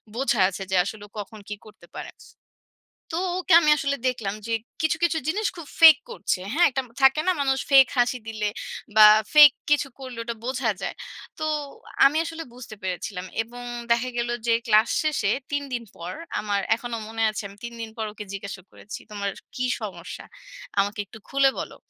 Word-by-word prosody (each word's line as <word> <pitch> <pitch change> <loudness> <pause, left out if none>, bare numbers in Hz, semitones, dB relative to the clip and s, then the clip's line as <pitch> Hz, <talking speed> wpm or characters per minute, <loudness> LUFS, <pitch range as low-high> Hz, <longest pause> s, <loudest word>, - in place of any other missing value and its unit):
বোঝা 240 -3 0
আছে 195 0 -6
যে - - +2
আসলে 205 +2 -7
ও - - -34
কখন 215 +1 -8
কী 210 - -3
করতে 210 -5 -16
পারে? - - -7 1.0
তো - - 0 0.2
ওকে 370 -1 -1
আমি 305 -2 +3
আসলে 280 0 -1
দেখলাম 220 -5 -3
যে 230 - -1 0.3
কিছু, 315 - +2
কিছু 335 -1 +2
জিনিস 415 +6 0
খুব 335 - -9
ফেক 320 -3 +10
করছে। 335 - -2
হ্যাঁ? 345 +5 +5
একটা 265 +1 -1 0.2
থাকে 270 +3 +6
না 370 - +4
মানুষ 270 -1 +1
ফেক 270 -1 +8
হাসি 245 +1 +2
দিলে 215 -2 -2 0.5
বা, 215 -1 +10 0.3
ফেক 295 -1 +10 0.2
কিছু 295 -1 +3
করলে 255 -3 -8
ওটা 235 0 -4
বোঝা 250 -2 0
যায়। - - -4 0.4
তো 310 - -3 0.6
আমি 290 - +2
আসলে 330 0 -6
বুঝতে 245 -3 -10
পেরেছিলাম। 185 0 -4 0.2
এবং 245 +2 -11 0.3
দেখা 235 +2 +2
গেল 235 0 -1 0.2
যে 230 - +4
ক্লাস 215 -1 +5
শেষে 300 -10 0 0.2
৩ 285 0 -1
দিন 240 -1 -3
পর 170 +2 -6 0.3
আমার 205 -1 -1 0.2
এখনো 240 0 -5
মনে 225 0 -3
আছে 215 - -5
আমি 200 - -15
৩ 235 0 -6
দিন 225 - -6
পর 220 -1 -3
ওকে 210 0 -8
জিজ্ঞাসা 195 -1 -7
করেছি, 210 - -9
"তোমার 200 -1 -3 0.3
কী 255 - 0 0.2
সমস্যা? 185 -4 -7 0.6
আমাকে 205 +1 -1
একটু 220 - -13
খুলে 275 0 +4
বলো।" - - -7
235 Hz, 185 wpm, -24 LUFS, 210-275 Hz, 1.0 s, ফেক